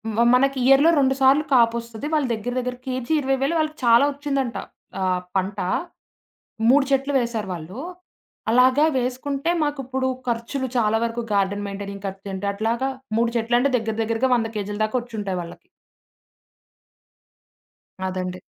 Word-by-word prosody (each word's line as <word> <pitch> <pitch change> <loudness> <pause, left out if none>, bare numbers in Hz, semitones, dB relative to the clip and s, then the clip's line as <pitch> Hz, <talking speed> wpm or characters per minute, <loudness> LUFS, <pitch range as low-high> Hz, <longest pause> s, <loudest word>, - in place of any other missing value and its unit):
మ 230 - -1 0.2
మనకి 275 +1 +2
ఇయర్‌లో 270 +4 +6
2 265 -1 +3
సార్లు 270 +3 +5
కాపొస్తది. 235 +1 +1
వాళ్ళ 300 -3 +2
దెగ్గర 225 +3 -4
దెగ్గర 250 0 -3
కేజీ 255 +3 -2
20,000 270 +4 0
వాళ్ళకి 310 0 -1
చాలా 235 +2 +6
ఒచ్చిందంట. 275 -4 -2 0.4
ఆహ్, 185 -1 +1
పంట. 195 +1 -1 1.1
3 275 +1 +5
చెట్లు 275 +1 +1
వేేశారు 230 -4 -2
వాళ్ళు. 175 +6 -8 0.7
అలాగా 255 +4 +5
వేసుకుంటే 270 +5 -1
మాకు 290 -1 -2
ఇప్పుడు 260 0 -1 0.2
ఖర్చులు 240 +3 -2
చాలా 225 -1 +2
వరకు 235 0 -2
గార్డెన్ 200 +1 +1
మెయింటైనింగ్ 200 0 -7
ఖర్చు 195 +1 -8
అంటే 190 +1 -4
అట్లాగా, 230 +6 -1 0.3
3 230 0 +2
చెట్లంటే 240 +4 +2
దెగ్గర 220 -2 -3
దెగ్గరగా 230 +3 0
100 225 -1 0
కేజీల 205 0 -4
దాకొచ్చుంటాయి 215 -5 -3
వాళ్ళకి. 170 - -11 2.4
అదండి. 185 -1 -4
235 Hz, 135 wpm, -23 LUFS, 210-270 Hz, 2.4 s, ఇయర్‌లో